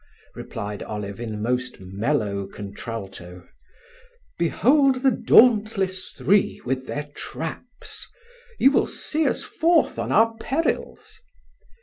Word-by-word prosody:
replied 105 0 -6
Olive 100 -1 -6
in 110 -3 -5
most 125 +2 -2
mellow 100 +1 -2
contralto. 95 -3 -8 0.9
"Behold 255 - +3
the 265 - +5
dauntless 210 -6 +3
three, 200 +1 +1
with 130 +1 -2
their 145 0 -4
traps! 205 +10 -7 0.5
You 270 - +5
will - - +2
see 310 +1 -1
us - - -1
forth 320 -5 +2
on - - -2
our 225 +1 +4
perils?" 315 +8 -3
150 Hz, 105 wpm, -23 LUFS, -, 0.9 s, the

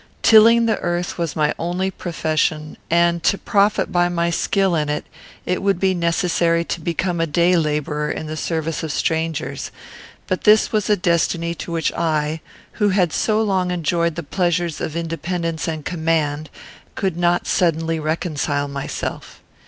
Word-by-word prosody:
Tilling 230 +1 +7
the 225 - +1
earth 175 0 -2
was 165 -3 -2
my 150 -1 +1
only 180 +3 -1
profession, 155 -3 -2
and, 170 0 +3
to 200 - +2
profit 205 0 +1
by 175 0 +2
my 170 -1 0
skill 190 +2 +1
in 150 -2 0
it, 150 0 -2 0.4
it 180 - -1
would 195 -2 +1
be 190 0 +2
necessary 170 -1 +1
to 170 - -4
become 170 +1 -1
a 165 - +1
day 170 +4 +3
labourer 150 -2 -1
in - - -4
the 155 0 -5
service 160 0 -2
of 160 -2 -3
strangers; 160 0 -2 0.6
but 185 - -2
this 215 +1 +5
was 215 -2 0
a 210 - +4
destiny 170 -1 0
to 170 - -7
which 165 -1 0
I, 155 -1 -1 0.3
who 210 -2 +1
had 185 -4 +2
so 215 0 +1
long 190 -3 0
enjoyed 170 -1 0
the - - -4
pleasures 175 0 -1
of 155 - -3
independence 165 0 -3
and 155 -2 -4
command, 160 -3 -1 0.5
could 190 -4 -1
not 175 0 +1
suddenly 165 -2 +1
reconcile 155 -2 -1
myself. 140 -1 -5
170 Hz, 160 wpm, -20 LUFS, 160-180 Hz, 0.6 s, Tilling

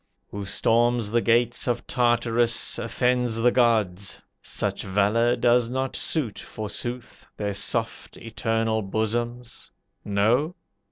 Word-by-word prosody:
"Who 100 -1 -5
storms 115 +2 +1
the 120 0 +2
gates 120 +2 +2
of 120 -1 -1
Tartarus, 120 -1 +1
Offends 125 0 0
the 115 +2 +3
gods. 105 -7 +1 0.2
Such - - -2
valor 105 +5 +2
does 120 -1 +3
not 130 +1 -2
suit, 135 -10 -1
forsooth, 120 +3 -6
Their 100 -1 -2
soft, 100 - -2
eternal 115 0 -1
bosoms; 120 +4 -3 0.3
no? 115 - +1
115 Hz, 110 wpm, -25 LUFS, 110-120 Hz, 0.3 s, the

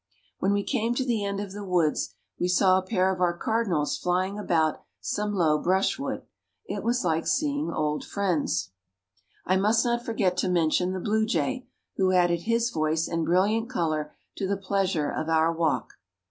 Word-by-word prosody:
When 195 - +1
we 200 0 +1
came 235 -1 0
to 260 - 0
the 230 -5 0
end 200 0 -2
of 200 -2 -5
the 205 +1 -7
woods 175 -5 0 0.2
we 175 - +1
saw 185 +1 +4
a - - -6
pair 185 -1 +1
of 185 - -6
our 175 -1 +2
cardinals 195 -9 0
flying 185 +3 0
about 160 -6 +1 0.2
some 210 0 -2
low 160 -6 +2
brushwood. 190 +4 0 0.4
It - - -4
was 240 -3 0
like 165 -1 0
seeing 290 0 0
old 150 -1 -1
friends. 155 - -1 0.7
I 185 - +2
must 215 +4 +3
not 240 0 0
forget 195 -6 0
to 185 - +1
mention 180 +1 +2
the 190 - -3
blue 220 +3 +1
jay, 255 +2 -1 0.3
who 190 -1 +3
added 175 -2 +3
his 230 +3 +1
voice 155 -1 0
and 165 -1 -1
brilliant 210 +6 +2
color 155 -9 -1 0.3
to 195 - -1
the 200 +1 0
pleasure 190 -5 0
of 155 +1 -3
our 160 +1 +3
walk. 165 -2 -1
185 Hz, 180 wpm, -26 LUFS, 165-210 Hz, 0.7 s, saw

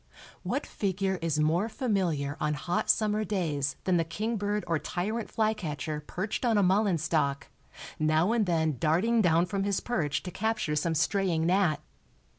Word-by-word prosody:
What - - -2
figure 190 -1 -1
is 160 -2 0
more 165 +8 +2
familiar 180 - -1
on 150 0 0
hot 175 +4 -2
summer 215 0 +2
days 155 -9 -1
than 180 -1 +2
the 165 - +2
kingbird 205 +4 -2
or 165 -2 0
tyrant 215 +9 -3
flycatcher 160 -9 -2
perched 200 +7 -3
on 230 -3 +3
a 205 - +4
mullein 190 0 +3
stalk, 145 -3 -1 0.5
now 155 +5 +2
and 225 -4 +1
then 160 -4 +1
darting 200 - +2
down 170 -2 +3
from 195 +2 -2
his 200 -1 0
perch 155 - -1
to 180 - -6
capture 220 -7 -1
some 160 +2 0
straying 170 0 +1
gnat? 175 -4 +2
180 Hz, 160 wpm, -29 LUFS, 155-210 Hz, 0.5 s, a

